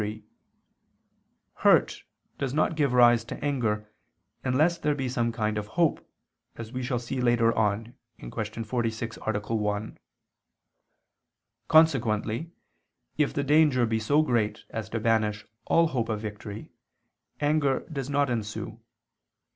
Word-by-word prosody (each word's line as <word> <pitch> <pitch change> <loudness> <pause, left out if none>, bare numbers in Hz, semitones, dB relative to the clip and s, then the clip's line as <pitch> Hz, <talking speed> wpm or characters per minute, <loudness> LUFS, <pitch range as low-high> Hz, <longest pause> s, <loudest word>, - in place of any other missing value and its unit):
3: 105 +1 -5 1.3
Hurt - - +3 0.4
does 135 -1 -2
not 155 +1 +1
give 145 -4 +1
rise 120 -2 +5
to - - -7
anger 110 -7 -1 0.6
unless 155 +7 +2
there 150 -2 0
be 135 -2 -2
some 120 -2 0
kind 110 -2 -1
of 105 - -6
hope, 170 -3 +2 0.5
as 115 -1 -8
we 130 - -3
shall 125 0 -1
see 125 +2 -4
later 120 -1 +3
on 110 +2 0 0.3
(Q. 110 0 -5
46, 115 0 -3
A. 110 -2 0 0.2
1). 105 0 -2 1.7
Consequently 135 -4 +3 0.7
if 150 - +3
the 140 - -2
danger 145 -4 +4
be 110 0 0
so 145 +8 +3
great 115 -7 -1
as 110 -1 -5
to 115 - -2
banish 110 -2 +1 0.2
all 165 -1 +3
hope 120 -5 -2
of 110 -1 -1
victory, 105 0 -7 0.7
anger 145 -2 +1
does 140 -4 -6
not 145 0 +2
ensue. 110 -3 -4
120 Hz, 130 wpm, -27 LUFS, 110-140 Hz, 1.7 s, rise